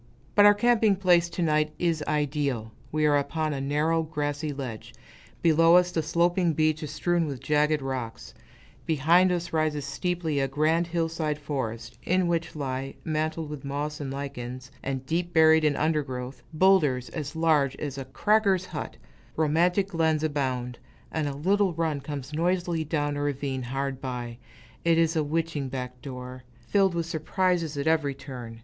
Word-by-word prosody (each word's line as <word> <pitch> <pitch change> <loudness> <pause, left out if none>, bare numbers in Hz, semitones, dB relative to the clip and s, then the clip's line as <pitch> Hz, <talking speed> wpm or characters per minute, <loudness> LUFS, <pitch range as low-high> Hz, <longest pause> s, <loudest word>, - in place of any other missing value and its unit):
But 205 0 +7
our 205 - +7
camping 220 -1 +3
place, 175 -3 +3
to 170 +1 -2
night, 155 -1 +1
is 165 -3 0
ideal. 140 -6 -1 0.2
We 155 0 +1
are 145 -1 +4
upon 155 +2 -2
a 135 - -3
narrow, 150 +4 +1
grassy 150 -1 -3
ledge; 130 -6 -7 0.5
below 165 +1 +6
us, 180 0 +4
the 165 - 0
sloping 170 +2 +2
beach 155 0 +1
astrewn 165 +3 0
with 135 -3 -5
jagged 150 +1 +1
rocks; 130 -4 -5 0.5
behind 165 +5 +4
us 175 -1 -2
rises 155 -2 0
steeply 160 +1 -2
a 135 - +1
grand 155 +5 +1
hillside 165 -3 -1
forest, 120 -5 -5
in 185 +1 +2
which 170 -1 -1
lie, 135 -2 -4
mantled 155 0 -2
with 150 -3 -7
moss 145 +2 -3
and 140 -2 -4
lichens, 130 -2 -6
and 135 -1 -4
deep 175 +4 -2
buried 160 0 +6
in 150 -2 +3
undergrowth, 135 -5 -2
boulders 155 -7 +3
as 150 -1 -5
large 155 -5 +2
as 140 -2 -5
a 135 - -5
"cracker's" 195 +6 +2
hut; - - -6 0.4
romantic 175 +5 +2
glens 160 -3 +1
abound, 130 -5 -2 0.3
and 155 -2 -1
a 140 - -3
little 195 +4 +2
run 160 -3 -1
comes 140 0 -6
noisily 175 0 0
down 145 -1 -1
a 145 - -3
ravine 140 -2 -2
hard 135 +2 -3
by, 120 -2 -5 0.4
it 170 -1 +3
is 165 0 +2
a 155 - +2
witching 155 -2 -2
back 125 -1 -6
door, 125 -2 -8 0.2
filled 190 - +2
with 170 -1 -1
surprises 165 -1 0
at 140 - -2
every 155 -4 +2
turn. 125 -4 -9
150 Hz, 165 wpm, -27 LUFS, 135-165 Hz, 0.5 s, But